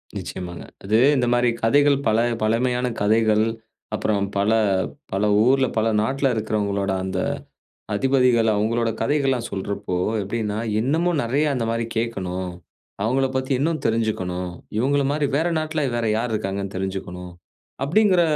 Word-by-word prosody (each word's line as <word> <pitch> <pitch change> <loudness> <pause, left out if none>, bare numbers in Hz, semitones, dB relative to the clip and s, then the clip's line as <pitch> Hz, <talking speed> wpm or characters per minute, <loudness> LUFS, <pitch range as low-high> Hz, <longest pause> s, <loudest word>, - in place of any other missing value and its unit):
நிச்சயமாங்க. 90 -2 -6 0.2
அது 105 +3 +2 0.2
இந்த 125 -2 +1
மாரி 120 0 +3
கதைகள் 145 +4 +4
பல 110 0 +3 0.2
பழமையான 125 +3 +1
கதைகள், 110 0 +3 0.5
அப்புறம் 100 -2 0
பல, 100 +2 +2 0.6
பல 95 +2 0 0.2
ஊர்ல 135 +1 +4
பல 110 +1 +2
நாட்டுல 135 +4 +1
இருக்கிறவங்களோட 100 -2 -1
அந்த 95 0 -2 0.7
அதிபதிகள் 125 -1 +3
அவங்களுடைய 115 +2 0
கதைகள் 140 +3 +1
எல்லா 130 - 0
சொல்றப்போ 100 -1 -3 0.3
எப்படின்னா, 105 +1 -2 0.2
இன்னமும் 160 +6 +1
நிறைய 135 +6 +1
அந்த 120 -4 -1
மாதிரி 115 0 -1
கேட்கணும், 95 -5 -2 0.5
அவங்கள 130 +4 +2
பத்தி 130 +1 -1
இன்னும் 155 +3 0
தெரிஞ்சுக்கணும்,"இவங்கள 110 +4 -1
மாரி 150 0 0
வேற 160 +4 +2
நாட்ல 155 -1 -2
வேற 120 -1 -1
யார் 115 +1 -2
இருக்காங்கன்னு 100 -1 -3
தெரிஞ்சுக்கணும்" 95 -1 -5 0.5
அப்படிங்கிற 185 +4 +4
115 Hz, 130 wpm, -23 LUFS, 100-135 Hz, 0.7 s, கதைகள்